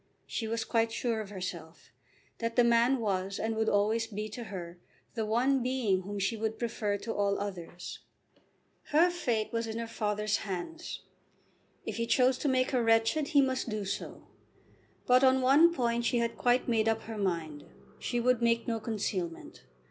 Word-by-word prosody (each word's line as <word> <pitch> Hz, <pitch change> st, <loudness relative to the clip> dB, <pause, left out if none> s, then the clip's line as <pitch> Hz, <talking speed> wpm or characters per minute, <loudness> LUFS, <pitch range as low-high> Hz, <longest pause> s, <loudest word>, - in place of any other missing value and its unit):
She 225 Hz, -, -3 dB
was 230 Hz, 0 st, -1 dB
quite 225 Hz, -1 st, +1 dB
sure 225 Hz, -1 st, -1 dB
of 205 Hz, -, -8 dB
herself, 175 Hz, -, -7 dB, 0.5 s
that 230 Hz, 0 st, -2 dB
the 245 Hz, -, +5 dB
man 235 Hz, +3 st, +4 dB
was 195 Hz, -4 st, -1 dB
and 225 Hz, 0 st, -2 dB
would 220 Hz, 0 st, +1 dB
always 215 Hz, +3 st, +2 dB
be 215 Hz, 0 st, -5 dB
to 235 Hz, +3 st, -7 dB
her 175 Hz, -4 st, -7 dB, 0.3 s
the 220 Hz, -2 st, -2 dB
one 255 Hz, +5 st, +2 dB
being 240 Hz, -7 st, +1 dB
whom 200 Hz, +2 st, -6 dB
she 200 Hz, +4 st, 0 dB
would 220 Hz, 0 st, -2 dB
prefer 220 Hz, -3 st, -1 dB
to 225 Hz, +3 st, -5 dB
all 200 Hz, -1 st, +1 dB
others. 180 Hz, -3 st, -6 dB, 0.9 s
Her 335 Hz, +4 st, +4 dB
fate 235 Hz, -12 st, -1 dB
was 230 Hz, 0 st, -1 dB
in 220 Hz, 0 st, -4 dB
her 230 Hz, -, -3 dB
father's 210 Hz, -2 st, -1 dB
hands. 215 Hz, -, -6 dB, 0.8 s
If -, -, -4 dB
he 230 Hz, 0 st, -1 dB
chose 255 Hz, +1 st, +3 dB
to -, -, -1 dB
make 255 Hz, -1 st, +2 dB
her 255 Hz, -3 st, +2 dB
wretched 225 Hz, +6 st, +3 dB
he 290 Hz, -3 st, +4 dB
must 260 Hz, -2 st, -1 dB
do 215 Hz, -2 st, -3 dB
so. 195 Hz, -, -5 dB, 0.8 s
But 250 Hz, +1 st, +5 dB
on 265 Hz, 0 st, +5 dB
one 280 Hz, +6 st, +6 dB
point 235 Hz, -6 st, 0 dB
she 240 Hz, -, +2 dB
had 235 Hz, 0 st, 0 dB
quite 245 Hz, +1 st, +2 dB
made 225 Hz, -2 st, +2 dB
up 225 Hz, 0 st, -1 dB
her 220 Hz, -1 st, -6 dB
mind. 165 Hz, -6 st, -2 dB, 0.3 s
She 240 Hz, -, -1 dB
would 245 Hz, 0 st, +2 dB
make 230 Hz, 0 st, +2 dB
no 230 Hz, -1 st, -1 dB
concealment. 200 Hz, -6 st, -4 dB
225 Hz, 180 wpm, -30 LUFS, 205-245 Hz, 0.9 s, one